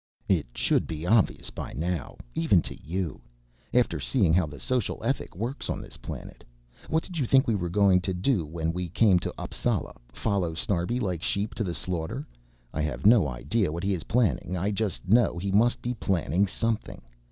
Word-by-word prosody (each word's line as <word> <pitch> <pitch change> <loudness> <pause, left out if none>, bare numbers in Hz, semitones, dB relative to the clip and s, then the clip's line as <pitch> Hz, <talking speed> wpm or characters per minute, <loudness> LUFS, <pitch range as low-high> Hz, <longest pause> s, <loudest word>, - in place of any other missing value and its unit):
"It - - +2
should - - +2
be 80 0 -5
obvious 105 +1 +2
by - - -6
now 85 +1 -3 0.2
even 85 +3 +3
to - - -5
you 85 -2 -3 0.5
after 125 -1 +2
seeing 100 -12 +2
how 90 -2 +3
the 70 -1 -9
social 125 - -1
ethic 135 -5 -2
works 115 +9 -4
on - - -1
this - - -9
planet. - - -8 0.5
What 160 +1 +1
did 175 -3 -6
you 130 - +1
think 135 +2 +5
we 115 - +3
were 90 -4 -1
going 95 0 +4
to 95 - -2
do 95 +1 +1
when 80 +1 -2
we 90 0 -3
came 95 0 +4
to - - -3
Appsala - - -2 0.2
follow 90 -2 -1
Snarbi 90 +7 0
like 90 -8 -2
sheep 105 +5 -1
to 115 - -2
the 90 -4 -3
slaughter? 90 - -3 0.5
I 80 - -1
have 70 -5 -3
no 105 -6 +7
idea 75 - 0
what 85 +3 -4
he 100 +1 +1
is 85 -4 -4
planning. 100 -6 +1
I 100 +4 0
just 100 -3 -2
know 115 -2 +4
he 95 +3 -2
must 115 +5 +3
be 125 - -1
planning 95 - +1
something. 115 - -2
95 Hz, 195 wpm, -27 LUFS, 85-115 Hz, 0.5 s, no